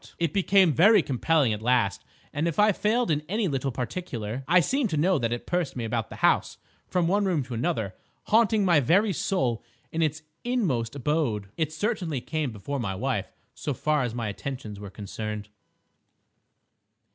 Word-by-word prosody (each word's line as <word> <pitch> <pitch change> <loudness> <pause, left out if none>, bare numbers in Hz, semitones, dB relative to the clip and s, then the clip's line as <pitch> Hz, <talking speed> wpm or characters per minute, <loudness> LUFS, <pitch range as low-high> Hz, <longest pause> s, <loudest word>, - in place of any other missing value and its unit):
It 170 -3 -1
became 195 -3 +4
very 200 - +6
compelling 140 -1 +2
at 105 - -5
last, 110 -4 +1 0.3
and, 150 +4 0
if 165 - -2
I 210 +1 +5
failed 215 +1 +1
in 150 -1 +1
any 210 +1 0
little 135 -3 -1
particular, 120 - -4
I 180 +2 +6
seemed 255 - +1
to 155 - -1
know 175 +2 +3
that 115 -2 -1
it 120 - -3
pursued 175 -5 -1
me 120 -3 -3
about 115 -1 -2
the - - -8
house, - - +2 0.3
from 180 -2 +1
one 200 +4 +2
room 170 -7 +1
to 125 0 -8
another, 110 -4 -1 0.3
haunting 220 -2 +3
my 170 -5 +5
very 190 - +3
soul 130 - -1 0.3
in 165 - -1
its 155 0 0 0.2
inmost 160 - 0
abode. 130 -8 -1
It 155 -2 -1
certainly 175 - -2
came 155 +3 -2
before 110 +7 -5
my 100 -5 -2
wife 115 -1 -2 0.2
so 145 - -4
far 150 +3 +1
as 120 -2 -2
my 115 -2 -2
attentions 105 -1 -6
were 100 -1 -7
concerned. 105 +1 -6
145 Hz, 180 wpm, -26 LUFS, 115-180 Hz, 0.3 s, very